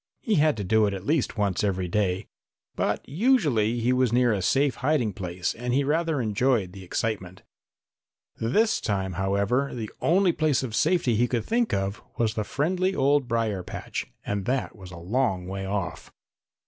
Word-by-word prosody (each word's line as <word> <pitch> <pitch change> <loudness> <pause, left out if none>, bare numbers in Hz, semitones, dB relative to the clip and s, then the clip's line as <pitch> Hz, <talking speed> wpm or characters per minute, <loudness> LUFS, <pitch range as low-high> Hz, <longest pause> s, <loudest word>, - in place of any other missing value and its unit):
He 225 - 0
had 155 -5 +3
to 100 - -3
do 110 +2 +3
it 100 - -2
at 95 0 -8
least 150 -4 0
once 100 -3 0
every 95 -3 0
day. 95 +1 0 0.5
But - - -1
usually 145 - +2
he 125 +2 +2
was 125 -2 +2
near 120 -1 +3
a 100 - -1
safe 135 +8 +2
hiding 130 -6 +1
place 90 -2 -3
and 125 +1 -2
he 140 - +3
rather 160 +1 0
enjoyed 110 -3 +1
the 95 0 -10
excitement. 95 -1 -3 0.9
This 215 - +2
time, 95 -3 -1
however, 100 +9 0
the 110 -3 -5
only 185 +2 +4
place 155 -5 +1
of 120 -4 -4
safety 155 -3 +2
he 120 +2 +3
could 120 -3 -1
think 235 0 +1
of 100 +1 -2 0.2
was 110 -2 +1
the 110 - -1
friendly 185 - 0
old 140 -1 +2
brier 115 -5 0
patch, - - -5 0.2
and 100 -2 -2
that 130 +1 -1
was 95 -3 -11
a 90 - -10
long 95 +1 0
way 95 +1 -5
off. 100 -3 -4
115 Hz, 180 wpm, -26 LUFS, 100-140 Hz, 0.9 s, only